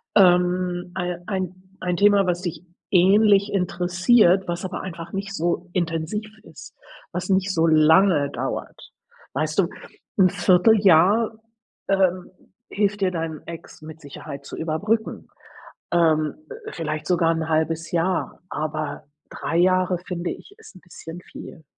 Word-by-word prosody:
ähm, 180 -1 +3
ei 180 -1 -2
ein 185 -2 -4 0.2
ein 180 -1 -1
Thema, 200 0 +4
was 180 -1 -1
dich 175 -1 -5 0.3
ähnlich 200 +2 +4
interessiert, 185 +2 +3
was 175 +1 -3
aber 185 - -5
einfach 170 -2 -8
nicht 195 0 -4
so 175 +1 -2
intensiv 175 +5 -2
ist, 160 -2 -13 0.4
was 180 +2 -4
nicht 190 0 +1
so 165 0 +2
lange 160 0 +4
dauert? - - -6 0.4
Weißt 155 +5 -1
du, 185 - +4 0.5
'n 185 -1 +6
1/4 190 +5 +4
Jahr, 200 +5 +4 0.6
ähm, 185 -2 +1 0.4
hilft 205 0 -1
dir, 190 -1 +2
dein 165 -3 -4
Ex 165 -1 -10
mit 160 +1 -11
Sicherheit 140 0 -9
zu - - -8
überbrücken, 205 +8 -2 0.6
ähm, 155 -3 +2 0.4
vielleicht 155 -2 -4
sogar 170 -2 +2
'n 160 -1 -3
1/2 160 +1 0
Jahr, 175 +1 -1
aber 155 0 -4 0.3
3 165 - -3
Jahre, 185 0 +3
finde 180 -1 -5
ich, 405 - -11
ist 440 - -15
'n 185 - -15
bisschen 170 -1 -10
viel. 160 -2 -12
180 Hz, 140 wpm, -23 LUFS, 165-190 Hz, 0.6 s, n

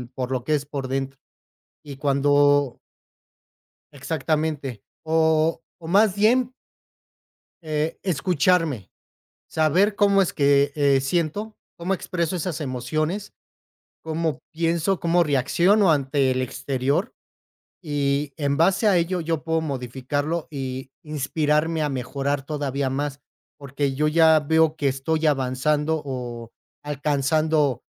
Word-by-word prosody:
por 130 -1 -3
lo 125 -2 -1
que 155 - +2
es 145 -1 -3
por 140 -2 -5
dentro, 135 0 -3 0.6
y 140 -2 -9
cuando 145 -1 +3 1.2
Exactamente, 150 -4 -2 0.2
o 160 0 +2 0.2
o 160 - -7
más 200 +2 +4
bien 245 +4 +2 1.1
Eh, 155 0 -2
escucharme, 165 - +1 0.6
saber 180 +7 +2
cómo 200 -1 +4
es 180 - -3
que, 140 0 +3
eh, 140 -2 +3
siento 170 +9 -2 0.2
cómo 180 +3 -1
expreso 170 -1 -2
esas 170 -2 -3
emociones, 155 +8 -3 0.7
cómo 160 -3 -2
pienso, 170 +3 0
cómo 170 +1 +3
reacciono 170 - +3
ante 135 -2 +1
el 130 - 0
exterior, 135 - -2 0.7
y 145 -3 -1
en 140 -2 0
base 190 +6 +3
a 195 - +4
ello, 175 +1 0
yo 165 -1 -2
puedo 160 0 0
modificarlo 145 +3 -3
y 130 -2 -5
inspirarme 150 +2 0
a 150 - 0
mejorar 135 +1 -2
todavía 140 -2 -2
más, 140 +1 -3 0.4
porque, 140 0 -3
yo 150 +3 +1
ya 160 0 +5
veo 160 +1 +2
que 145 -3 0
estoy 155 +4 -1
avanzando, 150 +3 0
o 120 -4 -6 0.3
alcanzando, 150 -1 0
150 Hz, 120 wpm, -23 LUFS, 135-165 Hz, 1.2 s, ya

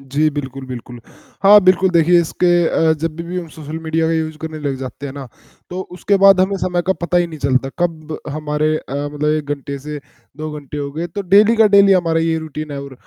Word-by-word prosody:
जी, 140 +3 0
बिल्कुल, 135 -2 -6
बिल्कुल, 120 -1 -8 0.4
हाँ, 205 +1 +8
बिल्कुल। 185 0 +4
देखिए, 170 0 +4
इसके 170 +2 -1 0.2
अ, 160 -1 +2
जब 160 0 -3
भी 170 - -5
भी 175 +2 -5
हम 170 - -6
सोशल 155 +1 -6
मीडिया 160 0 -1
का 165 - 0
यूज़ 160 -1 -2
करने 160 -1 -6
लग 140 -3 -3
जाते 135 +2 -7
हैं 135 - -7
ना, 140 -2 -7 0.4
तो 180 - -4
उसके 200 +3 +1
बाद 195 -1 +6
हमें 195 +1 +1
समय 175 -1 -1
का 190 - +3
पता 175 - 0
ही 175 - +1
नहीं 160 -2 -9
चलता, 135 -1 0
कब 160 -3 -2
हमारे 150 +1 -1
अ, 140 - -8
मतलब 145 +1 -3
1 155 -1 -1
घंटे 140 0 -7
से 150 +2 -7 0.4
2 155 0 -5
घंटे 145 0 -9
हो 140 0 -4
गए, 165 +3 -3
तो 200 +3 -5
डेली 205 +5 +5
का 220 - +6
डेली 200 -1 +6
हमारा 165 -3 +2
ये 165 0 0
रूटीन 155 -1 -7
है 140 - -5
और 140 -1 -10
160 Hz, 235 wpm, -18 LUFS, 145-175 Hz, 0.4 s, हाँ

